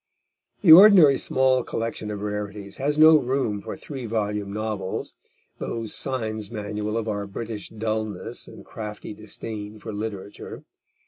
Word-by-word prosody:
The 170 Hz, -, +7 dB
ordinary 175 Hz, -6 st, +9 dB
small 130 Hz, -1 st, +2 dB
collection 115 Hz, -2 st, -4 dB
of 105 Hz, -1 st, -5 dB
rarities 105 Hz, -1 st, -5 dB
has 145 Hz, +2 st, 0 dB
no 155 Hz, 0 st, +8 dB
room 125 Hz, -6 st, -1 dB
for -, -, -7 dB
three 135 Hz, -5 st, -7 dB
volume 105 Hz, -2 st, -2 dB
novels, 105 Hz, -3 st, -4 dB, 0.5 s
those 115 Hz, -2 st, -4 dB
signs 110 Hz, -6 st, -2 dB
manual 105 Hz, 0 st, -3 dB
of 115 Hz, -1 st, -2 dB
our 100 Hz, -2 st, -2 dB
British 105 Hz, +1 st, -6 dB
dulness 110 Hz, -3 st, -4 dB
and -, -, -12 dB
crafty 105 Hz, -1 st, -7 dB
disdain 105 Hz, 0 st, -7 dB
for 110 Hz, +1 st, -7 dB
literature. 105 Hz, -1 st, -6 dB
110 Hz, 135 wpm, -24 LUFS, 105-120 Hz, 0.5 s, ordinary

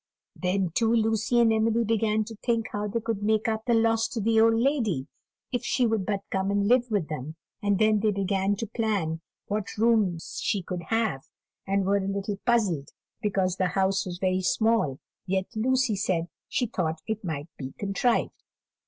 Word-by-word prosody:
Then, 185 Hz, -1 st, 0 dB
too, 225 Hz, +2 st, +2 dB
Lucy 225 Hz, +1 st, +2 dB
and 230 Hz, -1 st, +5 dB
Emily 225 Hz, +1 st, +2 dB
began 220 Hz, -1 st, +1 dB
to 225 Hz, +1 st, -9 dB
think 230 Hz, 0 st, -1 dB
how 205 Hz, 0 st, -2 dB
they 230 Hz, +3 st, -2 dB
could 220 Hz, -2 st, -2 dB
make 215 Hz, +1 st, +1 dB
up 220 Hz, 0 st, -1 dB
the 235 Hz, -, +4 dB
loss 225 Hz, 0 st, +3 dB
to 235 Hz, -, -4 dB
the 220 Hz, +1 st, +3 dB
old 225 Hz, 0 st, +5 dB
lady, 230 Hz, -, +1 dB, 0.5 s
if 245 Hz, -, -1 dB
she 250 Hz, -, +1 dB
would 220 Hz, -4 st, 0 dB
but 200 Hz, -2 st, 0 dB
come 190 Hz, 0 st, 0 dB
and 200 Hz, 0 st, +1 dB
live 245 Hz, +1 st, +3 dB
with 200 Hz, -8 st, 0 dB
them; 155 Hz, 0 st, -5 dB, 0.3 s
and 205 Hz, -1 st, +2 dB
then 215 Hz, +1 st, +3 dB
they 215 Hz, +1 st, +2 dB
began 195 Hz, 0 st, 0 dB
to 230 Hz, -, -4 dB
plan 200 Hz, -8 st, -1 dB, 0.2 s
what 205 Hz, -1 st, -3 dB
rooms 210 Hz, -7 st, +1 dB
she 200 Hz, -3 st, 0 dB
could 180 Hz, 0 st, -4 dB
have, 220 Hz, -12 st, 0 dB, 0.4 s
and 195 Hz, 0 st, +1 dB
were 200 Hz, +1 st, +3 dB
a 195 Hz, -1 st, -2 dB
little 200 Hz, 0 st, -3 dB
puzzled 200 Hz, -12 st, +2 dB, 0.3 s
because 190 Hz, -3 st, 0 dB
the 185 Hz, -, +2 dB
house 190 Hz, 0 st, +1 dB
was 175 Hz, -1 st, -5 dB
very 185 Hz, 0 st, +1 dB
small; 220 Hz, -, +2 dB, 0.3 s
yet 190 Hz, 0 st, 0 dB
Lucy 255 Hz, 0 st, +2 dB
said 180 Hz, -4 st, -1 dB, 0.2 s
she 245 Hz, -, 0 dB
thought 160 Hz, -8 st, -2 dB
it 220 Hz, -1 st, -3 dB
might 160 Hz, -3 st, -4 dB
be 130 Hz, -1 st, -7 dB
contrived. 205 Hz, +4 st, 0 dB
205 Hz, 190 wpm, -27 LUFS, 190-225 Hz, 0.5 s, and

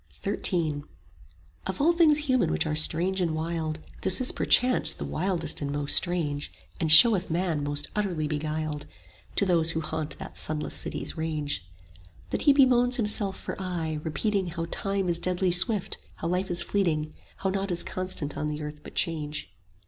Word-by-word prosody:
XIII 170 Hz, -7 st, -1 dB, 0.9 s
Of 190 Hz, -1 st, -4 dB
all 330 Hz, +4 st, +4 dB
things 325 Hz, -3 st, +5 dB
human 255 Hz, -3 st, +2 dB
which -, -, +1 dB
are 155 Hz, -, -1 dB
strange 175 Hz, +5 st, +3 dB
and 165 Hz, -3 st, 0 dB
wild 160 Hz, -1 st, -3 dB, 0.2 s
This 190 Hz, 0 st, +2 dB
is 255 Hz, -, +4 dB
perchance 250 Hz, 0 st, +3 dB
the -, -, -6 dB
wildest 165 Hz, -3 st, -1 dB
and 140 Hz, -1 st, -2 dB
most 145 Hz, 0 st, 0 dB
strange, 160 Hz, -5 st, -1 dB, 0.3 s
And 160 Hz, -2 st, +1 dB
showeth 190 Hz, +3 st, +7 dB
man 165 Hz, -3 st, -1 dB
most 145 Hz, 0 st, -2 dB
utterly 180 Hz, -7 st, -1 dB
beguiled, 155 Hz, 0 st, -3 dB, 0.5 s
To 200 Hz, -, +3 dB
those 170 Hz, -3 st, +2 dB
who 160 Hz, 0 st, -1 dB
haunt 155 Hz, -1 st, -5 dB
that -, -, -7 dB
sunless 155 Hz, -1 st, -1 dB
City's -, -, -1 dB
range; 150 Hz, -, -3 dB, 0.6 s
That -, -, -1 dB
he 285 Hz, -, +5 dB
bemoans 255 Hz, -3 st, +4 dB
himself 210 Hz, -3 st, +3 dB
for -, -, -5 dB
aye, 165 Hz, -4 st, -3 dB
repeating 195 Hz, +5 st, -1 dB
5 170 Hz, -, -7 dB
How 165 Hz, -, -2 dB
Time 195 Hz, -1 st, -1 dB
is 170 Hz, -1 st, 0 dB
deadly 180 Hz, +1 st, +1 dB
swift, 190 Hz, +3 st, +1 dB, 0.2 s
how 165 Hz, -, -4 dB
life 185 Hz, +2 st, -1 dB
is 175 Hz, -1 st, +2 dB
fleeting, 155 Hz, -7 st, -1 dB, 0.2 s
How 190 Hz, -, -1 dB
naught 195 Hz, +1 st, -2 dB
is 175 Hz, -1 st, +1 dB
constant 185 Hz, -6 st, -4 dB
on 150 Hz, -, -2 dB
the 150 Hz, 0 st, -4 dB
earth 150 Hz, 0 st, -7 dB
but -, -, -12 dB
change. 150 Hz, -, -2 dB
170 Hz, 175 wpm, -27 LUFS, 155-195 Hz, 0.9 s, showeth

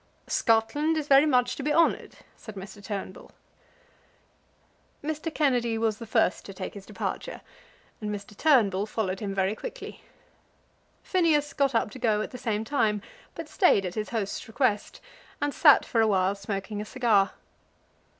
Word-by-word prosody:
"Scotland 290 Hz, +8 st, +1 dB
is 300 Hz, -2 st, -3 dB
very 280 Hz, +2 st, +6 dB
much 250 Hz, -3 st, +2 dB
to -, -, -6 dB
be 295 Hz, +2 st, -1 dB
honoured," 330 Hz, +2 st, +2 dB, 0.2 s
said 215 Hz, -, -11 dB
Mr. 200 Hz, +1 st, -10 dB
Turnbull. 195 Hz, -2 st, -6 dB, 1.7 s
Mr. 310 Hz, +2 st, -3 dB
Kennedy 245 Hz, -7 st, +1 dB
was 220 Hz, -1 st, 0 dB
the 230 Hz, -, -8 dB
first 220 Hz, -3 st, +1 dB
to 195 Hz, -, -9 dB
take 185 Hz, -, -6 dB
his 200 Hz, -1 st, -11 dB
departure, -, -, -5 dB, 0.6 s
and 210 Hz, -, -3 dB
Mr. 205 Hz, 0 st, -6 dB
Turnbull 210 Hz, -9 st, +3 dB
followed 195 Hz, -4 st, -2 dB
him 205 Hz, -3 st, -4 dB
very 190 Hz, +1 st, +1 dB
quickly. -, -, -8 dB, 1.0 s
Phineas 315 Hz, -6 st, +1 dB
got 275 Hz, -3 st, +1 dB
up 225 Hz, -, +1 dB
to 260 Hz, -, -10 dB
go 220 Hz, -3 st, +1 dB
at -, -, -5 dB
the 250 Hz, -, -8 dB
same 220 Hz, -3 st, -1 dB
time, 215 Hz, -5 st, 0 dB, 0.3 s
but -, -, -7 dB
stayed 355 Hz, -, +3 dB
at 180 Hz, -, -4 dB
his 215 Hz, +1 st, -4 dB
host's 215 Hz, -4 st, -3 dB
request, 220 Hz, -2 st, -1 dB, 0.4 s
and 290 Hz, -1 st, -1 dB
sat 295 Hz, -4 st, +6 dB
for 230 Hz, -, +1 dB
awhile 195 Hz, -3 st, +2 dB
smoking 200 Hz, +1 st, -5 dB
a -, -, -6 dB
cigar. 215 Hz, -5 st, +2 dB
225 Hz, 160 wpm, -27 LUFS, 205-275 Hz, 1.7 s, very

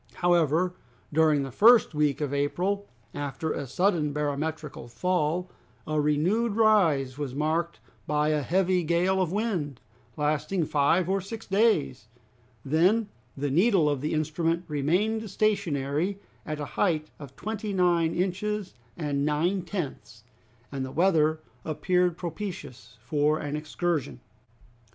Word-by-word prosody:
However, 175 Hz, 0 st, +2 dB, 0.4 s
during 155 Hz, -2 st, +3 dB
the 135 Hz, -, -6 dB
first 225 Hz, -, +6 dB
week 150 Hz, -1 st, +1 dB
of 145 Hz, -2 st, -2 dB
April, 185 Hz, +8 st, -1 dB, 0.3 s
after 145 Hz, +2 st, -3 dB
a 140 Hz, -, -4 dB
sudden 160 Hz, 0 st, +1 dB
barometrical 150 Hz, -2 st, -3 dB
fall, 175 Hz, +6 st, -1 dB, 0.3 s
a 155 Hz, -1 st, 0 dB
renewed 185 Hz, +10 st, +1 dB
rise 165 Hz, -, +3 dB
was 135 Hz, -3 st, -4 dB
marked 160 Hz, +3 st, -1 dB, 0.3 s
by 150 Hz, 0 st, +1 dB
a 150 Hz, -1 st, +1 dB
heavy 180 Hz, +5 st, +1 dB
gale 175 Hz, +4 st, +2 dB
of 175 Hz, -3 st, 0 dB
wind, 180 Hz, -, -2 dB, 0.4 s
lasting 155 Hz, +4 st, 0 dB
five 150 Hz, +5 st, +2 dB
or 195 Hz, +1 st, 0 dB
six 220 Hz, +4 st, -8 dB
days; 195 Hz, -, +1 dB, 0.6 s
then 185 Hz, +10 st, +2 dB, 0.3 s
the 140 Hz, 0 st, -2 dB
needle 180 Hz, -, +4 dB
of 145 Hz, -3 st, 0 dB
the 150 Hz, -, -2 dB
instrument 165 Hz, +3 st, -1 dB
remained 190 Hz, +10 st, 0 dB
stationary 180 Hz, -4 st, 0 dB, 0.3 s
at 155 Hz, -1 st, -3 dB
a 145 Hz, -, -3 dB, 0.2 s
height 155 Hz, -5 st, +1 dB
of 140 Hz, -3 st, -11 dB
twenty 215 Hz, +2 st, -4 dB
nine 175 Hz, -3 st, +2 dB
inches 195 Hz, +2 st, -2 dB, 0.2 s
and 145 Hz, -4 st, -1 dB
nine 160 Hz, +6 st, +1 dB
tenths, 145 Hz, -, -6 dB, 0.5 s
and 135 Hz, -1 st, -3 dB
the 130 Hz, -, -4 dB
weather 160 Hz, -3 st, +2 dB, 0.2 s
appeared 180 Hz, +2 st, +1 dB
propitious 165 Hz, -, -7 dB
for 150 Hz, +4 st, +1 dB
an 145 Hz, -1 st, -4 dB
excursion. 150 Hz, -, -2 dB
160 Hz, 130 wpm, -27 LUFS, 145-185 Hz, 0.6 s, first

